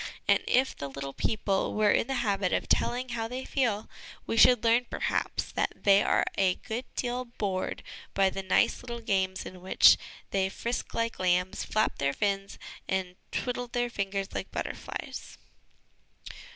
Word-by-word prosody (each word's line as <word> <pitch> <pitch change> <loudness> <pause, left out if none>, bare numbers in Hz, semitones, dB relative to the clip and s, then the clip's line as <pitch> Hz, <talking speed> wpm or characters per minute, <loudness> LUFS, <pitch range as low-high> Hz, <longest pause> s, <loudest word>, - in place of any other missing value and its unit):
And, - - +5
if 260 +2 +2
the 140 - -5
little 140 0 -6
people 200 +1 0
were 210 -1 +4
in - - +2
the 270 - -1
habit 195 -3 +1
of - - 0
telling 250 +1 +1
ho 230 -2 -2
v - - -16
they 255 +2 -5
feel, 225 -6 0 0.4
we - - -2
should 240 0 +6
learn 235 +1 +3
perhaps - - -1
that - - 0
they 200 0 +6
are - - +2
a 185 -2 +3
good 240 +2 -5
deal 250 0 -2
bored 200 -6 -3 0.3
by 195 -1 +4
the 195 - -4
nice 190 - +2
little 235 -1 -6
games 190 -4 0
in 185 -1 -9
which 185 - +6 0.3
they 190 -1 +1
frisk 235 +5 -4
like 230 0 -1
lambs, 180 0 +1
flap 215 0 0
their 140 0 +1
fins, 200 0 -1 0.3
and 185 -1 -1 0.2
twiddle 245 0 -2
their 240 0 -1
fingers 195 -2 -3
like - - -4
butterflies. - - -6
205 Hz, 165 wpm, -29 LUFS, 190-240 Hz, 0.4 s, should